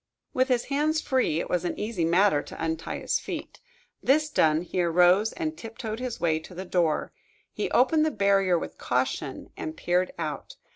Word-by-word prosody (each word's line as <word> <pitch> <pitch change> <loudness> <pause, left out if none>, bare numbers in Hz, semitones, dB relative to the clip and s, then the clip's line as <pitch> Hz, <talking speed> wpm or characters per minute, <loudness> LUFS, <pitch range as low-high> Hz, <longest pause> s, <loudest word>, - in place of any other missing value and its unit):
With 255 0 +2
his 250 -3 +1
hands 300 +3 +1
free, 260 - +1
it - - -3
was 180 -1 0
an 175 - -3
easy 210 -6 -1
matter 170 -2 +4
to - - -8
untie 160 0 -2
his - - 0
feet. - - -7 0.4
This 300 +3 +2
done, 155 - +3
he 180 +1 -2
arose 180 +5 +4
and 320 -2 -3
tiptoed 225 -3 -6
his 250 -2 -4
way 160 -2 +1
to 175 +3 -13
the 185 +2 -5
door. 170 -4 0 0.4
He - - -2
opened 305 +5 +4
the 315 - +2
barrier 195 - +3
with - - -6
caution, 130 +2 -2
and 155 0 -6
peered 180 +1 +1
out. 155 -4 -5
185 Hz, 185 wpm, -27 LUFS, 165-250 Hz, 0.4 s, matter